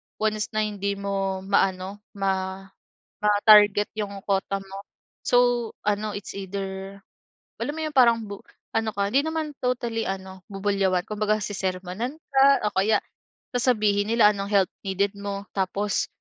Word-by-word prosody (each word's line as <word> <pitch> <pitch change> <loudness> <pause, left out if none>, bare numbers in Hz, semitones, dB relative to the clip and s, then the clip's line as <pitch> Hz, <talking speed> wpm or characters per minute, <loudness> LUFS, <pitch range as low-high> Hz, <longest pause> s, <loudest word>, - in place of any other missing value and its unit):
once 215 0 -1
na 215 - +2
hindi 200 -1 -2
mo 195 -1 -2
maano 195 0 0 0.2
ma 190 -1 -2 0.6
ma-target 210 0 +6
'yung 200 -2 -4
kota 195 0 0
mo. 195 0 -10 0.5
So 245 -2 +3 0.2
ano 210 +1 0
it's 205 -1 -7
either 195 0 -5 0.6
alam 290 - -2
mo - - -3
'yong 295 - -8
parang 235 -3 +6
bu 200 0 -8 0.3
ano 220 -1 +1
ka 200 0 +1
hindi 275 +2 +3
naman 315 -2 -3
totally 240 -2 -1
ano 190 -1 -6
bubulyawan, 195 -2 +1
kumbaga 215 0 0
sesermunan 190 +6 -3 0.2
ka 275 -5 +5
o 205 - -3
kaya 210 +3 +3 0.6
sasabihin 215 -5 +2
nila 215 -3 +6
anong 200 0 -4
help 195 -2 +3 0.2
needed 195 +1 +1
mo, 200 0 -4
tapos 200 +2 0
200 Hz, 140 wpm, -25 LUFS, 195-215 Hz, 0.6 s, ma-target